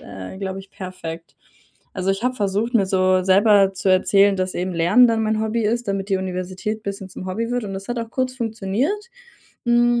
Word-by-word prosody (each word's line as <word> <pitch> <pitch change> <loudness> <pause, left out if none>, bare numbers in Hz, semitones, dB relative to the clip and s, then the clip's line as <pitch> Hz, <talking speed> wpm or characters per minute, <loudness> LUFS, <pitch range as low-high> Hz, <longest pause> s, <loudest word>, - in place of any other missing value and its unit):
äh, 95 - -9
glaube 190 -1 -4
ich, 195 0 -12
perfekt. 170 -3 -8 0.6
Also, 190 0 0
ich 195 +2 -2
habe 250 +1 0
versucht, 210 +3 -1
mir 200 -4 +4
so 185 -1 +2
selber 195 0 +5
zu 195 +1 -2
erzählen, 195 +1 +4
dass 185 0 -2
eben 185 +1 -2
Lernen 180 +9 +5
dann 225 -1 +1
mein 215 0 0
Hobby 220 +1 -1
ist, 235 +1 -1
damit 195 0 -2
die 195 - +3
Universität 185 +3 -4
bisschen 195 -1 -5
zum 185 - -8
Hobby 225 +5 -3
wird 245 -2 -1
und 195 -1 -5
das 195 0 -7
hat 240 0 -2
auch 230 -1 -5
kurz 255 +1 -1
funktioniert, 235 - -2 0.6
hm, 240 0 +3
200 Hz, 205 wpm, -21 LUFS, 190-230 Hz, 0.6 s, selber